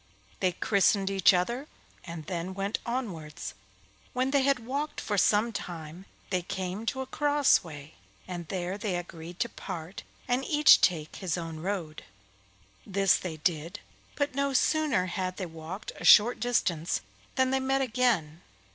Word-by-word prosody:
They 185 -2 +1
christened 195 +1 +2
each 195 -1 +5
other 235 +10 -1 0.4
and 170 -3 -7
then 180 +2 -4
went 200 +2 -2
onwards. 185 - -4 0.6
When 255 +1 0
they 280 -1 +4
had 265 -3 +1
walked 285 +4 -3
for 210 - -2
some 210 +4 +3
time 170 -2 -7 0.3
they 185 -2 +1
came 190 +3 -4
to 265 - -1
a - - -3
crossway, 255 - +1 0.3
and 175 -3 -6
there 185 +2 -3
they 205 -3 -1
agreed 175 0 -7
to 235 - +2
part, 170 -3 -7 0.3
and 250 +2 +1
each 300 -1 +6
take 160 -4 +1
his 180 -5 -2
own 165 -2 -5
road. 170 -3 -4 0.8
This 195 -1 +3
they 165 -4 -4
did, 165 +4 -2 0.4
but 285 -1 -1
no 280 +1 0
sooner 285 -8 +2
had 185 0 -3
they 190 - -3
walked 165 +4 -7
a - - -10
short 230 +4 +7
distance 180 -9 0 0.3
than 260 -1 +2
they 265 - +2
met 270 +1 +1
again. 220 - 0
190 Hz, 155 wpm, -29 LUFS, 170-250 Hz, 0.8 s, short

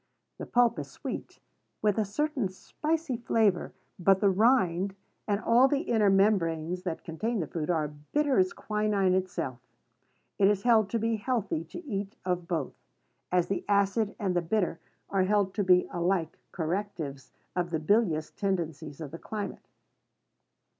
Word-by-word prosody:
The - - -6
pulp 245 -1 +3
is - - -6
sweet, - - -7 0.4
with 210 0 +2
a 215 - +2
certain 265 0 -1
spicy 305 - -2
flavor; 220 -6 +1 0.3
but 190 +2 +4
the 200 -1 +4
rind, 195 -3 +3 0.3
and 205 -1 +1
all 235 +4 +5
the 280 +1 +1
inner 220 - +2
membranes 180 -4 +2
that 175 -3 -4
contain 215 +8 -2
the 165 - -1
fruit, 155 +1 -4
are 160 -4 +1 0.2
bitter 290 -5 +2
as 185 0 +3
quinine 210 -3 0
itself. 175 -9 -2 0.8
It 195 - +6
is 205 -1 +2
held 225 -4 +4
to 230 - 0
be 225 0 0
healthy 215 -8 -1
to 310 - -9
eat 205 -4 -4
of 180 -2 -1
both, 165 -7 -2 0.6
as 180 -1 +3
the 195 - -2
acid 200 +1 +2
and 190 -3 -1
the 175 - +3
bitter 175 -1 0 0.3
are 195 -1 +2
held 200 -1 +2
to 205 - 0
be 180 -1 +4
alike 175 -1 0
correctives 160 -5 -4 0.2
of 175 -1 0
the 165 - 0
bilious 160 -2 +1
tendencies 165 -6 -3
of 145 -3 -6
the 165 - -8
climate. 210 -2 -6
195 Hz, 160 wpm, -29 LUFS, 175-215 Hz, 0.8 s, It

